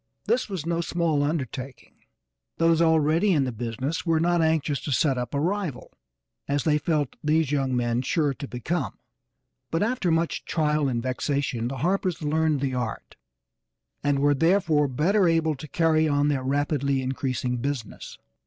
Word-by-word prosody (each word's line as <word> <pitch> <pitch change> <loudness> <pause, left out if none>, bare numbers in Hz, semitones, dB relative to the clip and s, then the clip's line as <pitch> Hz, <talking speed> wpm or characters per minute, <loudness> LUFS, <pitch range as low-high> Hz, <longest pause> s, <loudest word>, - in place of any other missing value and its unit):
This 250 -2 +1
was 185 -6 -4
no 170 0 0
small 165 -3 0
undertaking; 135 -3 -4 0.6
those 165 0 +3
already 160 +4 +3
in 145 -4 +3
the 130 - -2
business 120 +7 -3
were 165 -2 +2
not 175 +1 +2
anxious 160 -3 +1
to 145 - -4
set 140 0 +2
up 125 +3 -4
a - - +1
rival, 175 -4 -2 0.6
as 140 0 0
they 150 -1 +2
felt 150 -4 -1
these 155 -1 +2
young 135 -3 0
men 120 0 0
sure 145 +2 0
to 140 - -7
become, 130 +5 -3 0.7
but 165 +4 0
after 225 -5 0
much 165 0 0
trial 150 -2 0
and 120 -3 -1
vexation 130 -2 -1
the 135 +2 -4
Harpers 185 -3 0
learned 155 -1 +1
the 135 -2 -1
art, 120 -3 -4 0.9
and 145 -1 +2
were 145 +1 +3
therefore 160 -1 +2
better 175 +9 +2
able 165 -1 +2
to 150 +2 -9
carry 160 0 +2
on 145 0 +2
their 140 -3 0
rapidly 140 0 0
increasing 130 -2 -2
business. 125 -3 -5
150 Hz, 165 wpm, -25 LUFS, 135-165 Hz, 0.9 s, those